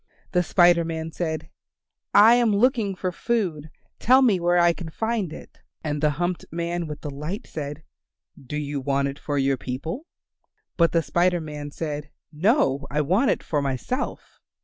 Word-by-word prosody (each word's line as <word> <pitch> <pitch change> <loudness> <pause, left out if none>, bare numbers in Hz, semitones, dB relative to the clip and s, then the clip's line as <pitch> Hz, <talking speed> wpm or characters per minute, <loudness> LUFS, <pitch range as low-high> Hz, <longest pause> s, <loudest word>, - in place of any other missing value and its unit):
The 180 - +3
Spider 175 -1 +4
Man 160 0 -4
said, 160 -2 -4 0.6
"I 215 +3 +8
am 235 -4 +3
looking 225 -3 +2
for 185 0 -2
food; 175 -8 -2 0.3
tell 260 +3 +5
me 210 -7 +4
where 175 +1 +2
I 175 0 +5
can 170 -1 -7
find 220 0 -2
it." - - -11 0.2
And 150 -2 -2
the 150 - +4
humped 175 +1 -1
man 170 0 -3
with 150 -1 -7
the 145 - -5
light 150 +9 -5
said, 150 0 -6 0.5
"Do 135 +3 -7
you 145 -1 -3
want 140 +1 0
it 140 +2 -8
for 145 -1 -3
your 135 -1 +2
people?" 160 - -5 0.7
But 170 -1 +3
the 165 -1 +2
Spider 175 +3 +2
Man 150 -2 -6
said, 150 -1 -5 0.2
"No, 150 - +2
I 150 +2 0
want 190 - +2
it - - 0
for 150 -3 -1
myself." 140 - -4
165 Hz, 170 wpm, -24 LUFS, 150-185 Hz, 0.7 s, I